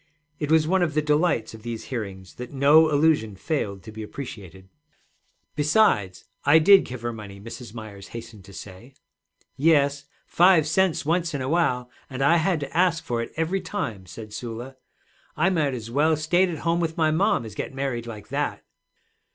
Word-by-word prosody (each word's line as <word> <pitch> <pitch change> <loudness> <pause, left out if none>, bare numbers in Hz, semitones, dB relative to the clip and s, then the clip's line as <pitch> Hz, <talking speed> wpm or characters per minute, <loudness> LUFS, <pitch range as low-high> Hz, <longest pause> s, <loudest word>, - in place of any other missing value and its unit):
It 150 - -3
was 160 -1 +4
one 190 +2 +2
of 155 -4 0
the 155 - +3
delights 150 -7 +1
of 110 - -11
these 115 0 -6
hearings 95 -5 -6
that 125 0 -7
no 150 +3 +5
allusion 145 -8 +2
failed 100 - -3
to 110 - -10
be 110 0 -8
appreciated. 100 -6 -9 0.9
'Besides, 150 - +2 0.2
I 145 +3 +6
did 195 +5 +6
give 125 -2 -8
her 120 0 -2
money,' 100 -3 -10
Mrs. 115 +1 -10
Myers 105 -3 -9
hastened 110 -3 -10
to 100 - -14
say. 100 +8 -11 0.6
'Yes; 145 -2 +3 0.2
five 175 -3 +4
cents 170 0 +1
once 170 0 0
in 140 - -3
a - - -3
while, 130 -7 +1 0.2
and 135 0 -3
I 165 +5 +5
had 170 0 +1
to 140 -1 -7
ask 175 -2 +2
for 120 -1 -2
it 115 - -6
every 170 +4 0
time,' 110 - -5
said 105 +5 -10
Sula. 120 +3 -7 0.6
'I 165 +5 +3
might 155 -6 +1
as 115 -1 -7
well 155 +4 +2
stayed 175 +5 +2
at 165 - -4
home 170 +1 +2
with 165 -1 -2
my 160 -1 +3
mom 170 - +1
as 110 - -8
get - - -5
married 135 -3 -3
like 110 -3 -9
that.' - - -2
140 Hz, 185 wpm, -24 LUFS, 110-160 Hz, 0.9 s, I